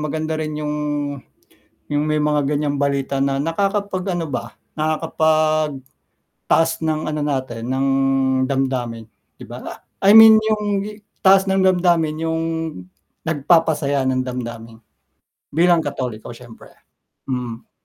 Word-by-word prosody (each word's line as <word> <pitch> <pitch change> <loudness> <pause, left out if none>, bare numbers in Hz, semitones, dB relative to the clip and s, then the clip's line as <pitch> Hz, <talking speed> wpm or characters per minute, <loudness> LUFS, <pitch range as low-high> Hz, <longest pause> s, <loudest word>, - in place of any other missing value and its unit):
maganda 155 +1 -3
rin 155 -1 -4
'yong 150 0 -3 1.1
'yong 145 0 0
may 155 -1 0
mga 150 -1 +1
ganiyang 145 0 -1
balita 140 -1 -1
na 135 0 0
nakakapag-ano 185 -1 -2
ba, 130 - -5 0.2
nakakapagtaas 155 -2 0 0.9
ng 155 -1 -1
ano 150 -1 -3
natin, 130 -5 -3
ng 130 +2 0 0.6
damdamin, 130 -4 -2 0.3
'di - - -8
ba? - - -9 0.4
I 200 - +7
mean, 220 0 +10
'yong 210 -2 0 0.4
taas 195 0 +5
ng 190 0 +2
damdamin, 170 -4 +2
'yong 160 0 -1 0.8
nagpapasaya 150 -3 +1
ng 130 0 +1
damdamin 115 -3 -6 0.7
bilang 170 +1 +3
Katoliko 125 -7 -5
siyempre, 120 -1 -14 0.6
mm. 125 -3 -5
150 Hz, 110 wpm, -20 LUFS, 135-165 Hz, 1.1 s, mean